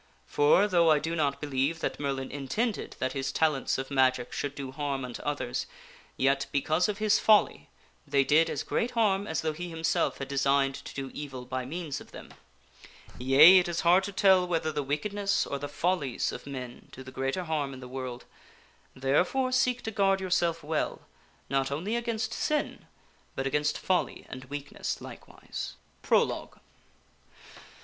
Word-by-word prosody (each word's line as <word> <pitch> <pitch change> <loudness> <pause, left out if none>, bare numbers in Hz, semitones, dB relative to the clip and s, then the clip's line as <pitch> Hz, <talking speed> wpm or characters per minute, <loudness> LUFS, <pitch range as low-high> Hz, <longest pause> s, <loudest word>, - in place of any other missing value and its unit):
For, 145 - +4
though 170 -4 +4
I 155 - +6
do 160 +3 -2
not 145 -3 0
believe 145 +2 -1
that - - -2
Merlin 135 -2 -3
intended 190 - -2
that 130 0 -2
his 135 -1 -2
talents 155 -4 +1
of 135 +1 -5
magic 130 -2 +2
should 145 0 -3
do 135 -2 -6
harm 140 -1 -3
unto 120 -1 -7
others, 145 -4 -3 0.5
yet, 135 +1 +2
because 155 +7 +1
of 205 - -2
his 215 0 +3
folly, 215 -1 +3 0.4
they 140 -1 +3
did 155 +4 +4
as - - -3
great 235 - -1
harm 205 -3 +2
as 160 - -1
though 155 -1 -1
he 175 +3 -6
himself 165 -1 0
had 135 - -5
designed 135 0 +2
to - - -9
do 135 -1 -5
evil 135 -4 -7
by 130 0 -4
means 155 0 -5
of - - -15
them. - - -11 0.9
Yea; 145 +9 +8
it 180 - -1
is 170 0 -2
hard 180 +3 +5
to 200 - -5
tell 190 -2 +4
whether 165 -2 0
the 150 -1 -2
wickedness 200 +9 -1
or 140 - -4
the 145 - -5
follies 155 -4 -1
of - - -8
men 125 -3 -8
do 130 - -10
the 130 - -10
greater 135 +7 -2
harm 155 -4 -2
in 130 - -9
the 125 - -9
world; 125 -1 -6 0.7
therefore 180 - +1
seek 250 -1 +1
to 220 - -3
guard 195 -2 +2
yourself 170 -3 0
well, 155 +1 -2 0.5
not 135 0 0
only 170 +11 -2
against 230 -2 -2
sin, 300 -1 -2 0.5
but 135 - -2
against 150 +2 0
folly 185 -1 -1
and 130 +1 -8
weak 145 +1 -7
ness - - -4
likewise. - - -8 0.3
Prologue. - - 0
145 Hz, 175 wpm, -28 LUFS, 135-180 Hz, 0.9 s, Yea